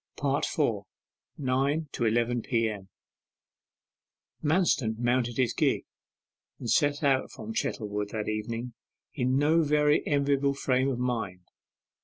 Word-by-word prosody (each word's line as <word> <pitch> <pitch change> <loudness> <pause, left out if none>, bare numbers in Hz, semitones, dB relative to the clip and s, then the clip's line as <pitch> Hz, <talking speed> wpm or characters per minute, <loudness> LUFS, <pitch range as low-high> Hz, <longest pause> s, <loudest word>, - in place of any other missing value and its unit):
4. 140 -1 0 1.0
NINE 140 +4 0
TO 120 - -1
ELEVEN 120 +2 +1
P.M. 110 -6 -1 1.5
Manston 150 -9 +2
mounted 120 0 0
his 125 -4 +2
gig - - +1 0.7
and 120 - -7
set 145 -1 +2
out 135 -2 +2
from 110 0 -8
Chettlewood 105 -2 -2
that 105 0 -4
evening 115 +3 -3 0.4
in 130 -1 +1
no 155 +4 +4
very 150 -1 +3
enviable 140 -1 +2
frame 130 0 +1
of 130 - -2
mind. 115 -7 -2
125 Hz, 115 wpm, -28 LUFS, 115-140 Hz, 1.5 s, no